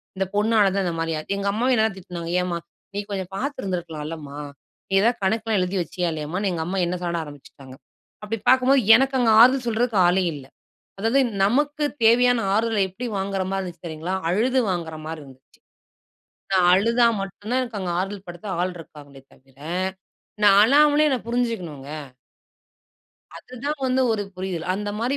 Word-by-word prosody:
இந்த 190 0 -1
பொண்ணால 210 0 +3
தான் 195 - +1
இந்தமாரி 165 -1 -2
ஆச்சு. 200 +6 -4
எங்க 200 0 -1
அம்மாவும் 250 +4 +1
என்னதான் 220 -3 +1
திட்டுனாங்க. 175 -2 -7
ஏன்ம்மா! 180 -1 -2 0.4
நீ - - -1
கொஞ்சம் 190 -1 -4
பார்த்திருந்திருக்கலாம்லம்மா! 165 - -5 0.5
நீ 195 - -4
எதாவது 235 +2 +2
கணக்குலாம் 220 +1 +1
எழுதி 180 +2 -1
வச்சியா 175 +2 -3
இல்லயாம்மான்னு, 170 +6 -2
எங்க 165 -2 -2
அம்மா 190 +2 -2
என்ன 180 +1 -2
சாட 170 -1 -2
ஆரம்பிச்சுட்டாங்க. 140 -2 -13 0.5
அப்பிடி 210 0 -4
பாக்கும்போது 260 +1 +5
எனக்கு 270 +2 +2
அங்க 240 - +3
ஆறுதல் 255 +1 +5
சொல்றதுக்கு 230 -2 +1
ஆளே 185 +1 +2
இல்ல. 135 -2 -10 0.5
அதாவது 225 +6 +2 0.2
நமக்கு 290 +7 +1 0.2
தேவையான 245 +2 +5
ஆறுதல 220 -1 +1
எப்பிடி 235 +7 -6
வாங்குற 195 0 -2
மாரி 195 0 -1
இருந்துச்சு 175 -1 -9
தெரியுங்களா! 160 +4 -4
அழுது 245 +8 +2
வாங்குறமாரி 160 -3 -4
இருந்துச்சு. 130 -1 -16 1.1
நான் 185 -2 +4
அழுதா 230 +4 +3
மட்டும் 195 +2 -7
தான் 255 -1 0
அங்க 185 -2 -3
ஆறுதல் 195 +1 -4
படுத்த 175 +4 -9
ஆள் 180 0 -1
இருக்காங்களே 145 -4 -13
தவிர, 135 0 -24 0.9
நான் 200 -1 +7
அழாமலே 295 +4 +5
என்ன 260 -3 0
புரிஞ்சுக்கணுங்க. 190 - -3 1.5
அது 255 - -13
தான் 295 +1 -1
வந்து 260 +1 +2
ஒரு 210 -2 -1
புரிதல். 185 -3 -4
அந்தமாரி 210 +6 -2
195 Hz, 155 wpm, -23 LUFS, 175-235 Hz, 1.5 s, நான்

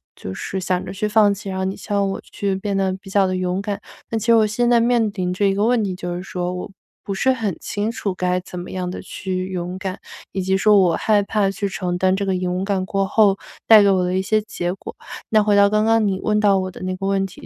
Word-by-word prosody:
就 95 - -7
是 190 - -4
想 180 0 -1
着 185 - -6
去 210 +2 -1
放 210 -1 +4
弃， 200 0 -7
然 190 - -4
后 190 - -1
你 190 - -2
希 - - -11
望 200 -1 +2
我 - - -5
去 195 -1 -3
变 195 0 -2
得 190 -1 +1
比 195 - -12
较 195 0 +3
地 185 - -1
勇 180 +1 -1
敢。 205 0 -3 0.3
但 225 - -1
其 220 - -5
实 230 - +6
我 220 -1 +5
现 240 +3 0
在 240 -1 +5
面 230 -2 +2
临 180 -1 -1
着 200 +2 +1
一 195 - +1
个 205 +2 +1
问 240 -2 +2
题， 190 -2 -2
就 175 -1 -4
是 180 - -4
说 180 -1 -4
我 180 +1 -6 0.3
不 200 - -4
是 260 +7 +2
很 215 -8 -2
清 205 +2 -2
楚 200 -4 -3
该 180 0 0
怎 180 0 -8
么 175 - -8
样 180 -1 -3
地 - - -6
去 185 -1 -4
勇 180 0 -4
敢， 190 0 -5 0.3
以 195 - -2
及 190 +1 +1
说 210 +1 +5
我 175 -3 +3
害 210 -2 +2
怕 200 -1 0
去 200 0 -3
承 180 -2 -3
担 185 0 +3
这 200 - -2
个 190 -1 0
勇 180 +1 -2
敢 195 -2 0
过 195 +1 0
后 200 -1 +3 0.3
带 215 -2 +9
给 200 - +4
我 185 -1 +2
的 180 +1 -1
一 190 - 0
些 215 +2 +2
结 195 -5 -3
果。 195 - -9 0.3
那 215 -1 +4
回 205 -1 +3
到 200 0 +6
刚 215 +1 +2
刚 225 0 +3
你 190 -1 -1
问 210 0 +2
到 200 -2 +4
我 185 0 -2
的 - - -12
那 185 0 -2
个 195 - -4
问 195 0 +1
题， 180 - -13
195 Hz, 305 characters per minute, -21 LUFS, 185-210 Hz, 0.3 s, 带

